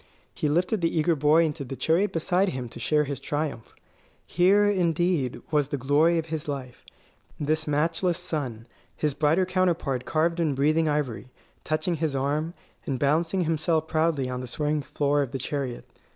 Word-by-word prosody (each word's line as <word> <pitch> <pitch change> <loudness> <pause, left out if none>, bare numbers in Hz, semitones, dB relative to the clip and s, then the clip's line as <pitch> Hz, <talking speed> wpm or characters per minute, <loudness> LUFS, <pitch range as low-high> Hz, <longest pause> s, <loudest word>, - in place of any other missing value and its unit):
He 150 - -1
lifted 180 +6 +1
the 165 0 0
eager 160 +2 +3
boy 150 +3 +4
into 150 -2 -3
the 135 0 -6
chariot 170 +9 +1
beside 180 +4 +1
him 130 -4 -4
to - - -10
share 150 -1 +2
his 140 -3 -4
triumph. 145 -6 -4 0.5
Here, 195 +4 +4
indeed, 175 - +1
was 150 -3 +2
the 145 - -3
glory 145 +6 +3
of 165 - -1
his 160 -2 -5
life 130 -4 -6 0.6
this 155 +2 0
matchless 165 +4 +1
son, 135 -10 -4 0.3
his 150 -2 0
brighter 155 +6 +2
counterpart 175 -9 0
carved 165 +2 +1
in 155 -5 +1
breathing 155 +3 +2
ivory, 130 -7 -2 0.3
touching 165 +3 -1
his 155 -3 -1
arm, 150 +5 -1 0.3
and 135 - -1
balancing 165 +7 +1
himself 160 -1 0
proudly 155 -5 +1
on 125 0 -4
the 125 - -6
swaying 150 +4 -1
floor 145 +2 0
of 135 -4 -3
the - - -1
chariot. 135 -1 -4
155 Hz, 170 wpm, -26 LUFS, 140-165 Hz, 0.6 s, boy